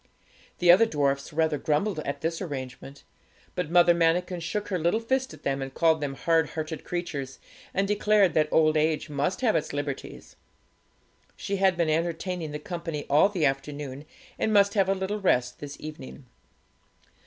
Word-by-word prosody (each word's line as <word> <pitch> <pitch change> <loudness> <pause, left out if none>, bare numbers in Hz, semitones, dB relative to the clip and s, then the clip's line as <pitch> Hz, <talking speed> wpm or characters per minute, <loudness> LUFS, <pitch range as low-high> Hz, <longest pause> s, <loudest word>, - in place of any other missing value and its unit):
The 175 -1 +6
other 215 +6 +6
dwarfs 140 -4 -1
rather 160 -1 +1
grumbled 155 +6 0
at 140 0 -4
this 165 +2 -2
arrangement; 135 -3 -7 0.5
but 180 -4 -3
Mother 175 0 +6
Manikin 175 +2 +1
shook 205 +6 -4
her 185 -3 -1
little 170 +7 +1
fist 260 +3 -1
at - - -13
them, 135 0 -1
and 135 0 -5
called 160 -2 +3
them 140 -2 -3
hard 165 +2 +1
hearted 155 0 -5
creatures, 145 -7 -4 0.3
and 195 +1 0
declared 210 -3 +3
that 155 0 +2
old 155 -1 +4
age 155 -1 0
must 150 - -1
have 230 -4 +2
its 155 - -1
liberties. 145 -1 -6 1.0
She 200 - -3
had 190 -2 +3
been 170 -2 +1
entertaining 170 +1 -2
the 150 - -4
company 165 -2 -5
all 155 +7 +5
the 180 -7 0
afternoon, 140 0 -3 0.3
and 220 - +1
must 200 -1 +4
have 195 -2 +2
a 195 - +2
little 195 +2 -3
rest 125 -10 +1
this 145 -1 -8
evening. 150 - -9
165 Hz, 170 wpm, -27 LUFS, 145-185 Hz, 1.0 s, The